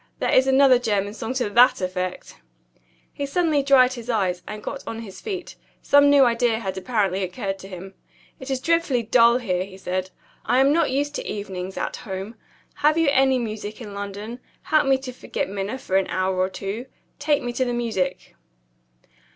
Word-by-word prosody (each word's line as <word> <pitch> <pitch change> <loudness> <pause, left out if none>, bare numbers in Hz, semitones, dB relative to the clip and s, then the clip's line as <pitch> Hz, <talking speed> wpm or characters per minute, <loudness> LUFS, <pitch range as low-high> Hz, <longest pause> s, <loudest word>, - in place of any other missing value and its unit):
There - - -1
is 260 +1 +5
another 265 -1 +5
German 205 -4 -1
song 225 +3 -5
to 255 -4 0
that 240 +4 +5
effect." 185 0 -4 0.8
He 285 -1 -4
suddenly 310 -1 +1
dried 265 -2 +5
his 240 -1 -9
eyes, 190 -6 0
and 210 0 -7
got 275 - -5
on 225 0 -5
his 200 -4 -10
feet; 385 -5 -5 0.3
some 285 0 +5
new 285 -2 +6
idea 235 -1 +2
had 195 -4 -4
apparently 195 -2 0
occurred 195 +2 -4
to 190 - -10
him. 190 0 -9 0.5
"It 260 - -8
is 265 -1 -1
dreadfully 330 -5 +1
dull 235 +1 +5
here," 185 -7 -1
he 190 0 -11
said; 185 0 -3 0.3
"I 250 - +1
am 275 +2 +4
not 330 -1 +2
used 285 +2 -1
to - - -6
evenings 190 -2 -5
at - - -3
home. 195 +1 -6 0.4
Have 300 +2 +3
you 330 -3 +3
any 265 -1 +3
music 215 -3 -5
in 210 -4 -8
London? 205 +4 -6 0.2
Help 310 -3 +2
me 270 -1 +4
to 260 -1 -7
forget - - -4
Minna 200 +5 -4
for 190 -7 -1
an 195 - +1
hour 185 0 -1
or 185 0 +1
two. 205 +6 -5 0.3
Take 290 0 +1
me 245 0 -3
to 260 - 0
the 245 - -1
music." 220 -7 -2
230 Hz, 190 wpm, -23 LUFS, 195-265 Hz, 0.8 s, new